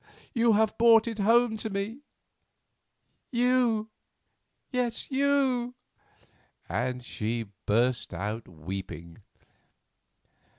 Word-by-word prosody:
You 235 -2 +4
have 220 +1 +1
brought 230 -1 +6
it 225 -2 -4
home 230 +2 +4
to 220 - -3
me; 200 +5 -3 1.3
you, 240 -3 +2 0.8
yes, 250 0 -2
you!" 265 -3 +1 0.9
and 125 +1 -2
she 110 -2 -3 0.2
burst 120 +4 +1
out 105 +3 -4
weeping. 85 0 -7
220 Hz, 85 wpm, -28 LUFS, -, 1.3 s, brought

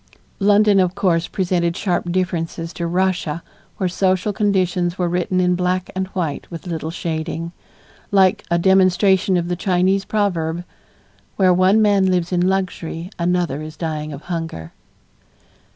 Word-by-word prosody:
London, 205 0 +4
of 185 -1 +1
course, 170 -3 +1
presented 175 -2 -1
sharp 175 -2 -1
differences 170 -2 -2
to 170 - -3
Russia 180 -3 -1 0.3
where 185 - 0
social 185 +2 0
conditions 185 -4 0
were 180 - 0
written 180 +1 0
in 180 0 +3
black 180 +1 -1
and 190 0 -1
white 175 -6 -4
with 170 0 -8
little 160 -2 -4
shading, 165 0 -4 0.6
like 190 -2 +3
a 170 - +2
demonstration 190 +1 +3
of 170 -1 -1
the 175 - -1
Chinese 185 +2 +1
proverb, 175 -5 -1 0.7
"Where 185 -2 +4
one 190 +4 +4
man 200 -2 +3
lives 180 -1 0
in 180 -1 +1
luxury, 180 -2 -3
another 170 -4 0
is 155 0 -8
dying 155 -2 -3
of 145 0 -8
hunger." 165 - -5
180 Hz, 145 wpm, -20 LUFS, 170-190 Hz, 0.7 s, London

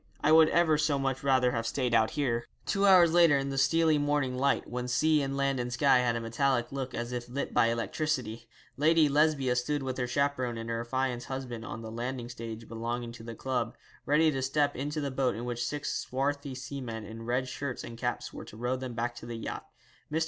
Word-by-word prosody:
I 150 - +4
would 160 0 +7
ever 160 -3 +3
so 150 -2 +2
much 135 -1 -1
rather 130 -2 +3
have 115 -1 -2
stayed 125 0 -1
out 110 -1 +4
here.' 120 -5 0 0.2
Two 200 0 +2
hours 175 -4 +7
later, 170 -4 +6
in 135 0 -2
the 135 - -3
steely 160 +2 +3
morning 145 -3 0
light, 140 +2 +1
when 125 0 -4
sea 155 +5 +3
and 135 0 -2
land 140 -1 +1
and 125 0 -3
sky 130 +1 +4
had 120 -1 +1
a - - -1
metallic 120 +2 0
look 135 -2 -4
as 120 +1 -4
if 120 -1 -5
lit 140 +3 -3
by 115 - +4
electricity, 115 -1 -2 0.3
Lady 155 +2 +4
Lesbia 145 -3 +2
stood 135 +4 -1
with 130 0 -3
her 125 - 0
chaperon 130 -2 0
and 115 0 -5
her 115 0 -1
affianced 125 0 -2
husband 130 -4 -5
on 115 - -6
the 110 - -7
landing 120 +1 -4
stage 115 -2 -7
belonging 115 +1 -4
to 115 -1 -11
the 115 0 -7
club, 130 +1 -2 0.3
ready 155 +2 +4
to 135 -2 -2
step 145 +2 +1
into 145 +4 -3
the 140 -1 -2
boat 130 -4 0
in 115 +2 -5
which 120 0 -2
six 145 +4 -3
swarthy 140 +1 -2
seamen 125 -4 -6
in 110 +2 -9
red 125 +3 -1
shirts 130 0 -4
and 115 0 -9
caps - - -3
were - - -8
to 110 - -12
row 125 +2 -1
them 130 -2 -6
back 120 +1 -1
to 120 - -10
the 120 - -5
yacht. 115 - -6 0.4
Mr. 160 - +1
130 Hz, 225 wpm, -30 LUFS, 120-140 Hz, 0.4 s, would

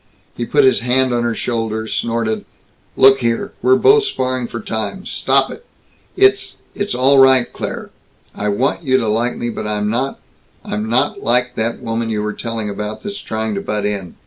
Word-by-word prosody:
He - - -4
put 435 - +3
his 395 - +4
hand 130 +1 +1
on 120 - +1
her 120 -1 -1
shoulder, 110 -2 -2
snorted, 115 -1 -2 0.5
"Look 135 0 +6
here. 115 -2 -1
We're 130 +2 +5
both 425 - +5
sparring 130 - -2
for 120 - -6
time. 110 - -4
Stop - - +1
it. - - -10 0.5
It's 395 +1 +3 0.2
it's 205 -7 -2
all 135 +2 +4
right, 130 -2 +6
Claire. - - -5 0.4
I 105 - -2
want 130 +10 0
you 130 -5 +2
to 115 -4 -1
like 115 +3 0
me, 120 0 -3
but 110 - -5
I'm 105 0 -1
not 130 +4 -2 0.5
I'm 105 +1 -3
not 130 +5 +1
like 125 +1 +2
that 115 +1 -2
woman 115 0 -2
you 105 -1 -1
were 105 0 -2
telling 115 -2 -4
about 105 +1 -5
that's 205 -1 -5
trying 110 0 -3
to 100 - -3
butt 105 -1 -2
in. 100 -4 -3
120 Hz, 190 wpm, -18 LUFS, 110-130 Hz, 0.5 s, Look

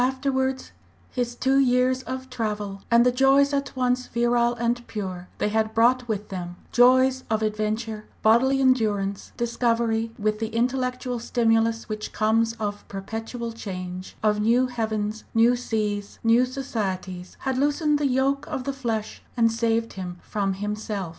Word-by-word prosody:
Afterwards, 265 0 -1 0.4
his 245 -1 -2
two 265 +2 +2
years 255 0 +3
of 260 0 -6
travel, 210 -4 -3
and 235 +1 +5
the 250 - +5
joys 270 +2 +4
at 280 -1 -2
once 250 0 0
virile 240 0 +2
and 240 +1 -1
pure 185 -4 -5
they - - 0
had 220 +1 0
brought 245 +2 +3
with 210 -2 -3
them, 175 -2 -5 0.2
joys 260 +1 +5
of 220 0 +1
adventure, 215 0 -2 0.2
bodily 260 +5 +4
endurance, 210 -7 +1
discovery, 230 -1 +1
together 225 -2 -14
with 215 0 +1
the 225 - -1
intellectual 250 +1 -1
stimulus 225 -1 +1
which 215 -1 -5
comes 225 +2 +2
of 205 -2 -5
perpetual 225 +4 -5
change, 185 -4 -7
of 210 -1 +2
new 235 +4 +4
heavens, 220 -3 -2
new 230 +2 +5
seas, 210 -4 -2
new 235 +2 +4
societies, 190 -8 -4
had 265 -1 -1
loosened 295 +1 +2
the 290 - +2
yoke 270 +2 +1
of 260 - -3
the 275 - -2
flesh 230 -5 -3 0.2
and 230 -1 +4
saved 230 0 0
him 180 -2 -6
from 200 -2 -1
himself. 205 -2 -3
230 Hz, 155 wpm, -25 LUFS, 215-255 Hz, 0.4 s, and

